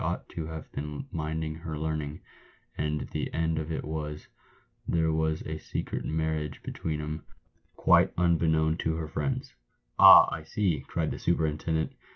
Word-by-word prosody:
ought - - -2
to 80 -2 -5
have 80 -1 -8
been 75 - -5
minding 80 0 -2
her 80 -1 -6
learning, 75 -1 -3 0.6
and 75 -1 -1
the - - -3
end 80 -1 +1
of 80 +1 -4
it 80 - -2
was, 75 -1 -5 0.6
there 80 -1 +2
was 80 0 0
a 80 0 -5
secret - - -4
mar 80 0 -1
riage 75 -2 -3
between 80 -2 -3
'em, 75 +1 -4 0.5
quite - - +5
unbeknown 80 -2 +3
to 80 -1 -1
her 80 -1 -3
friends." 130 - -3 0.5
"Ah, - - +11
I - - -4
see!" 80 -2 -1
cried 80 -2 -1
the - - -5
superintendent. 80 -1 0
80 Hz, 160 wpm, -28 LUFS, 75-80 Hz, 0.6 s, Ah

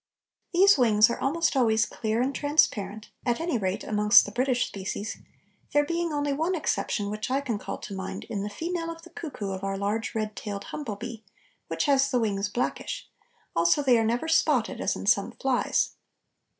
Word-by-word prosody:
These 385 -2 +6
wings 215 -2 +5
are - - -3
almost 330 +3 +1
always 230 -3 +3
clear 225 +1 -1
and 270 +2 -1
transparent, 215 -9 +1
at 240 -2 0
any 330 -7 -1
rate 190 +1 -2
amongst 210 0 +5
the 205 - -7
British 250 +2 +1
species, 200 +2 -5 0.6
there 290 0 +4
being 335 +1 -1
only 290 -1 0
one 325 +6 0
exception 205 -9 -1
which 215 +2 -4
I 265 +2 +2
can 240 -7 -3
call 195 - -5
to 200 - -8
mind 190 -1 -5
in 215 -4 -4
the 205 - -3
female 330 - -3
of 330 0 -8
the 350 - -14
cuckoo 235 -11 -5
of 190 0 -5
our 195 0 -2
large 210 +4 -2
red 215 -1 -2
tailed 200 -2 -5
humble 275 -9 -5
bee, 220 +2 -7 0.4
which - - -1
has 275 -1 +3
the 250 - +1
wings 205 -3 0
blackish; 245 +4 -3 0.4
also 170 - +3
they 255 -3 +5
are - - +2
never 240 +7 0
spotted, 305 -7 +2
as - - 0
in - - -6
some 200 -1 +2
flies. 265 -2 +1
235 Hz, 190 wpm, -27 LUFS, 205-290 Hz, 0.6 s, These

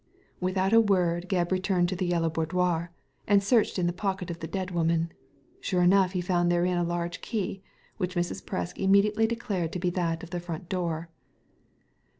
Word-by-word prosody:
Without 185 +2 0
a 230 - +8
word 180 -4 +1
Gebb 175 -2 +1
returned 185 -1 +2
to 185 - -2
the 180 0 -1
Yellow 170 -2 +1
Boudoir, 170 +1 0 0.4
and 200 -1 +4
searched 220 0 +2
in 180 - +1
the 175 - +1
pocket 190 -1 -2
of 170 - -7
the 160 - -5
dead 185 +2 -3
woman. 165 -1 +1 0.5
Sure 180 -2 +1
enough 185 +1 +4
he 180 - 0
found 175 -1 +1
therein 175 +1 +2
a - - +1
large 175 0 -3
key 195 -3 -3 0.4
which 180 +1 -2
Mrs. 175 0 -2
Presk 180 -2 -4
immediately 200 +3 +4
declared 210 -8 -2
to 180 - -2
be 180 0 0
that 170 -2 -1
of 170 - -9
the 175 - -2
front 170 0 -7
door. 170 -3 -2
180 Hz, 185 wpm, -28 LUFS, 175-190 Hz, 0.5 s, a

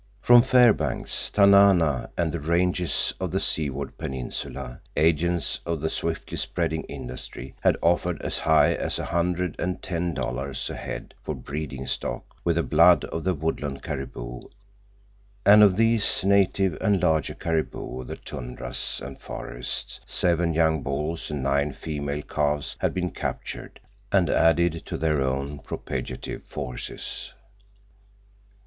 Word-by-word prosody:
From 120 +3 +7
Fairbanks, 125 -3 +3
Tanana, 100 -8 +5
and 85 -2 +1
the 85 - -3
ranges 90 +3 +1
of 95 -1 -2
the 95 +3 0
Seward 70 -5 -1
Peninsula 60 -1 -5 0.2
agents 85 +2 +2
of 85 -2 -2
the 80 +2 -2
swiftly - - -3
spreading 80 0 -1
industry 65 +1 -8
had - - +3
offered 85 0 +2
as - - -1
high 80 -1 +4
as - - -2
a - - -3
hundred 85 0 0
and 90 +1 -2
ten 85 -2 -2
dollars 65 +2 -2
a - - -5
head - - -6
for 75 - -4
breeding 70 0 -5
stock - - -2 0.2
with 85 -1 +1
the 85 - +1
blood 85 +3 +5
of 80 - -5
the 95 -1 +1
woodland 75 -2 -3
caribou, - - -5 1.1
and 105 +1 +8
of 100 -3 +6
these 115 -3 +4
native 95 -2 +3
and 100 -4 +2
larger 80 -3 +1
caribou 80 -5 -3
of 65 - -10
the - - -5
tundras 60 0 -4
and 70 0 -9
forests - - -5
seven 85 -2 +2
young 80 -2 +3
bulls 75 +5 -3
and 75 -3 -3
nine 70 +2 +1
female 75 -1 -4
calves 75 -1 -1
had - - +1
been 90 -1 -1
captured - - -5 0.3
and 95 -3 +3
added 80 0 +3
to - - -5
their 75 -3 +1
own 70 +2 -2
propagative - - -5
forces. 60 -1 -5
80 Hz, 140 wpm, -25 LUFS, 70-90 Hz, 1.1 s, and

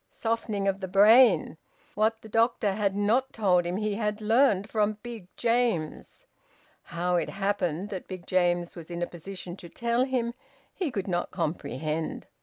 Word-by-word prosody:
Softening 225 -3 -2
of 195 0 0
the 190 - -3
brain! 200 -3 +5 0.3
What 220 +1 0
the - - -9
doctor 225 -2 +2
had 200 -1 0
not 225 +6 +1
told 180 -5 +2
him 180 +2 -2
he 210 0 -1
had 210 0 -2
learned 215 -2 +3
from 210 -1 0
Big 230 -6 -8
James. 230 -9 -1 0.6
How 175 +1 -1
it - - -1
happened 195 -2 -1
that 190 -3 -6
Big 185 -2 -8
James 175 -1 +1
was 170 -2 -10
in 175 0 -3
a - - +2
position 175 +1 -8
to 170 - -11
tell 235 +6 0
him 245 -3 -1 0.4
he 360 -5 -2
could 205 -7 -4
not 175 -2 -1
comprehend. 155 -2 -3
200 Hz, 165 wpm, -27 LUFS, 175-225 Hz, 0.6 s, brain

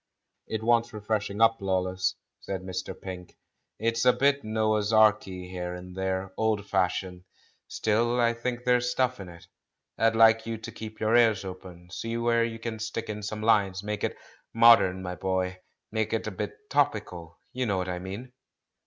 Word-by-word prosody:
"It 110 0 -3
wants 115 0 +3
freshening 105 -1 -3
up, 115 0 +5
Lawless," 95 -1 0 0.2
said 95 -1 -5
Mr. 95 -1 -5
Pink; 90 -2 -8 0.4
"it's 115 +1 0
a 125 - +7
bit 140 +2 +2
Noah's 110 -1 0
Arky 105 -4 +3
here 90 -1 -4
and 90 0 -10
there 95 0 -2
— - - -42
old 110 -2 +1
fashioned. 90 -1 -1 0.4
Still 120 +3 +1
I 115 -1 +3
think 120 +1 -4
there's 125 0 +2
stuff 130 -1 0
in 95 -2 -8
it. 85 -1 -13 0.5
I'd 115 0 +3
like 115 0 +5
you 115 0 -3
to 115 +1 -8
keep 110 0 -9
your 110 +1 +2
ears 110 -5 +4
open, 90 -1 -10
see 115 +4 -4
where 115 0 +2
you 115 -1 -3
can 115 -1 -5
stick 110 +1 -4
in 105 0 -6
some 105 +1 -5
lines. 100 -4 +2
Make 105 0 -4
it - - -1 0.4
modern, 115 -6 +6
my 90 -1 -4
boy, 95 0 -2 0.3
make 110 0 -1
it 110 - -1
a 110 - -3
bit 105 - -6
topical; 105 - -1 0.2
you 125 -1 -1
know 100 -3 +1
what 90 0 -2
I 90 -1 -3
mean?" 100 +8 -7
110 Hz, 180 wpm, -27 LUFS, 95-115 Hz, 0.5 s, a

